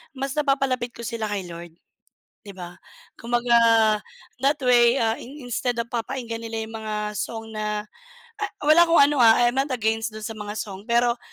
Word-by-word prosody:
mas 270 +1 -3
napapalapit 270 -4 0
ko 235 - -9
sila 230 -1 -3
kay 195 -3 -3
Lord, 170 -1 -10 0.7
di 200 - -8
ba? 175 -1 -9 0.4
Kumbaga, 240 0 +1 0.9
that 280 +2 +2
way, 240 0 +5
ah, 225 -1 +1
in 270 +1 -10
instead 245 0 -2
of 230 - -9
papakinggan 235 -1 -4
nila 225 -1 -4
yung 225 0 -10
mga 215 -1 -4 0.2
song 225 +2 -5
na 210 0 -3 0.5
ah, 420 -1 -3
wala 310 +3 +7
akong 335 -2 +5
ano, 290 +1 +3
ah, 225 0 +7
I - - +4
am 265 - -3
not 275 +1 0
against 225 -1 -1
dun 215 0 -7
sa 225 - -6
mga 210 0 -6
song, 200 -1 -7
pero 235 0 +2
235 Hz, 185 wpm, -24 LUFS, 220-255 Hz, 0.9 s, wala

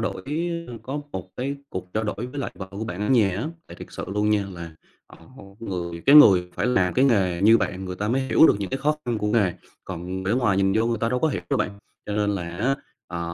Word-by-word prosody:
đổi, 95 - -3 0.5
ơ 125 - -8
có 140 +3 -4
một 95 0 -6
cái 135 +3 -3
cuộc 90 -5 -6
trao 110 +1 0
đổi 105 +3 -3
với 145 - -4
lại 135 - -3
vợ 95 - -6
của 100 +3 -5
bạn 90 -2 -6
ở 105 - -1
nhà 115 -7 +4
á, 140 +9 -2 0.2
tại - - -11
thiệt - - -10
sự - - -6
luôn 105 +2 0
nha, 105 -2 +1 0.6
ờ, - - -16 0.2
một 100 -4 -14
người 85 -4 -4
cái 140 - +7
người 95 -11 +8
phải - - -1
làm 95 -8 +2
cái 130 - +4
nghề 95 -9 +2
như 110 +2 +7
bạn 95 -1 -3
người 90 0 -5
ta 105 +2 -2
mới 130 +3 +1
hiểu 135 +4 +5
được - - +4
những 100 - -4
cái 135 - -2
khó 150 +2 +1
khăn 120 -2 -1
của 105 - -2
nghề, 105 -4 +2 0.3
còn 95 +1 -5
để 95 - +1
ngoài 115 -6 +2
nhìn 95 0 +2
vô 110 +1 +2
người 115 -2 0
ta 115 - +1
đâu 125 - 0
có 160 - +2
hiểu 95 - -3
đâu - - +3
bạn. - - 0 0.4
Cho 105 - -3
nên 105 -1 +1
là 90 -4 -3
á, 125 +8 +1 0.3
ờ, 85 - -5
105 Hz, 270 wpm, -24 LUFS, 95-125 Hz, 0.6 s, người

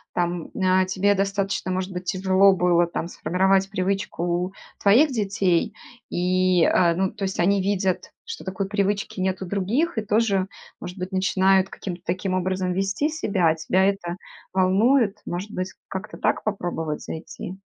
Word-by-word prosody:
там, 175 -1 -1
э, 185 -1 +3
тебе 200 +2 +2
достаточно, 195 -1 -1
может 185 +1 -2
быть, 180 0 -5
тяжело 190 +1 +4
было 175 -1 +3
там 170 0 -4
сформировать 190 +2 +1
привычку 195 -2 -2
у 175 +2 -1 0.3
твоих 245 +10 +5
детей 195 -6 0 0.3
и, 185 0 +2
э, 170 -2 +3
ну, 190 +1 0
то 210 -2 -7
есть 190 0 -2
они 195 +2 +3
видят, 190 -1 -1
что 460 0 -7
такой 190 +1 -3
привычки 200 -1 -1
нет 190 0 -1
у 190 - -3
других, 220 - -1
и - - +2
тоже, 210 -3 +1 0.3
может 180 +2 -8
быть, 185 +2 -4
начинают 190 0 +3
каким-то 175 -3 -7
таким 185 +2 -2
образом 185 0 -1
вести 195 - 0
себя, 200 - 0
а 160 - +2
тебя 185 +4 +1
это 195 -3 -1 0.4
волнует. 200 +4 +3
Может 185 +4 -4
быть, 185 -2 -4 0.2
как-то 190 +2 -6
так - - 0
попробовать 170 -7 -3
зайти? 175 +3 -7
190 Hz, 160 wpm, -24 LUFS, 180-200 Hz, 0.4 s, твоих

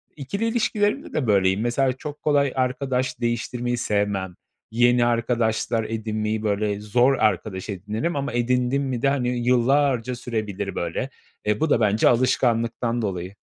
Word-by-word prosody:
ikili 155 +10 -3
ilişkilerimde 225 +1 0
de 145 -6 -1
böyleyim. 95 -1 +3
Mesela 125 +2 +1
çok 145 +3 -8
kolay 140 -3 +2
arkadaş 130 0 -1
değiştirmeyi 120 +1 -1
sevmem, 100 -5 -1 0.4
yeni 120 +1 +4
arkadaşlar 115 -1 0
edinmeyi, 110 -1 -2
böyle, 105 -1 0
zor 120 +6 +3
arkadaş 105 -5 -1
edinirim 105 - -3
ama 140 -3 -2
edindim 125 +3 +1
mi 130 -3 -3
de, 135 - +3
hani, 130 -3 0 0.2
yıllarca 125 0 +2
sürebilir 105 -5 -4
böyle. 85 +10 -3 0.4
E, 105 0 +1
bu 160 - +1
da 120 - +3
bence 105 -1 +3
alışkanlıktan 120 -1 +1
dolayı. 95 -2 -4
120 Hz, 140 wpm, -23 LUFS, 105-130 Hz, 0.4 s, yeni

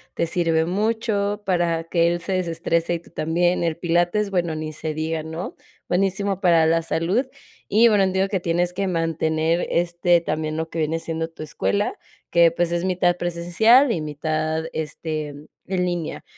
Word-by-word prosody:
te 170 - +1
sirve 165 -1 +1
mucho, 205 +1 -1
para 170 -3 +1
que 170 0 +2
él 175 0 0
se 175 +3 -6
desestrese 170 -1 0
y - - -4
tú - - -20
también, 175 +3 +1
el 165 -1 -1
pilates, 175 +4 +1
bueno, 170 -4 0
ni 155 0 -5
se 155 0 -4
diga, 160 0 -2
¿no? 160 +3 -6 0.3
Buenísimo 195 +1 0
para 170 -3 +5
la 165 +1 +3
salud. 175 +11 0 0.4
Y 225 +3 +5
bueno, 205 -2 +4
entiendo 190 +1 +1
que 195 - 0
tienes 175 +1 0
que 195 +1 -1
mantener, 165 -1 0
este, 175 0 +2
también 155 -1 -2
lo 160 0 -2
que 165 - -5
viene 160 +1 0
siendo 165 0 -3
tu 160 -1 -9
escuela, 100 -9 -1 0.4
que 170 -1 +6
pues, 170 +1 -1
es 175 +1 -1
mitad 180 -1 +2
presencial 175 +10 +3
y 165 - -1
mitad, 155 +1 -2
este, 155 0 -4 0.4
en 180 -1 0
línea. 175 -3 -3
170 Hz, 170 wpm, -23 LUFS, 160-185 Hz, 0.4 s, que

